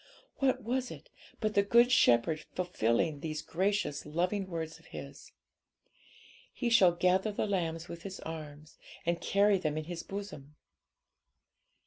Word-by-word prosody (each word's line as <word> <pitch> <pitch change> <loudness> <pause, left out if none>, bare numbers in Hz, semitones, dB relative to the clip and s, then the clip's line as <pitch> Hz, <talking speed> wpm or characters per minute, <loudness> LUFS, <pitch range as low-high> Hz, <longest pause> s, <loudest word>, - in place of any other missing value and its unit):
What 265 -4 +1
was 250 +3 -1
it, - - -11 0.3
but 215 -1 0
the 200 - +5
Good 235 +5 +5
Shepherd 155 - +4
fulfilling 155 -4 0
those 155 0 -4
gracious 190 -4 -1
loving 180 +6 -1
words 160 -3 -5
of - - -20
His - - -10 1.2
'He 240 -2 -2
shall 185 -6 +6
gather 185 +4 +2
the 205 - -1
lambs 170 -4 -2
with 170 0 -8
His 190 +1 -7
arm, 155 -2 -7 0.4
and 170 0 0
carry 200 0 +3
them 155 -3 -1
in 155 - -2
His 170 +1 -6
bosom'? 195 -8 -8
175 Hz, 140 wpm, -31 LUFS, 155-205 Hz, 1.2 s, shall